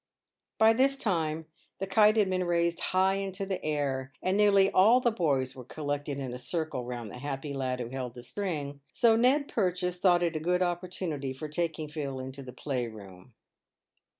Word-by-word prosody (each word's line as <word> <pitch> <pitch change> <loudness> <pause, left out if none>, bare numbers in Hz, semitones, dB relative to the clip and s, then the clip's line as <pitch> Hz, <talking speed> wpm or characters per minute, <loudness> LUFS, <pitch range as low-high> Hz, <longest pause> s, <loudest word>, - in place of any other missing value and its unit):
By 220 0 +6
this 270 +3 +3
time 160 -8 -1 0.3
the 195 - -3
kite 210 +3 +4
had 210 -3 +4
been 185 -1 0
raised 170 -1 +1
high 190 +1 +2
into 195 0 -3
the 190 -1 -4
air, 135 -3 -1
and 185 +1 +1
nearly 200 -1 +5
all 220 +7 +6
the 240 -2 +2
boys 140 - 0
were 130 - -9
collected 145 +1 -4
in 130 -3 -4
a 125 - -6
circle 150 0 -3
round 120 -4 -6
the 125 - -9
happy 140 +1 -4
lad 130 -2 -2
who 120 -1 -4
held 125 -2 -5
the 120 - -9
string, 145 -8 -4
so 230 -2 +5
Ned 265 +5 +3
Purchase 180 -3 -1
thought 175 -2 +4
it 170 -1 0
a - - 0
good 180 +3 +1
opportunity 175 -6 -3
for 150 +4 -6
taking 160 0 -2
Phil 145 -3 -4
into 130 +1 -7
the 130 -2 -9
playroom. 115 -6 -6
160 Hz, 185 wpm, -29 LUFS, 135-190 Hz, 0.3 s, By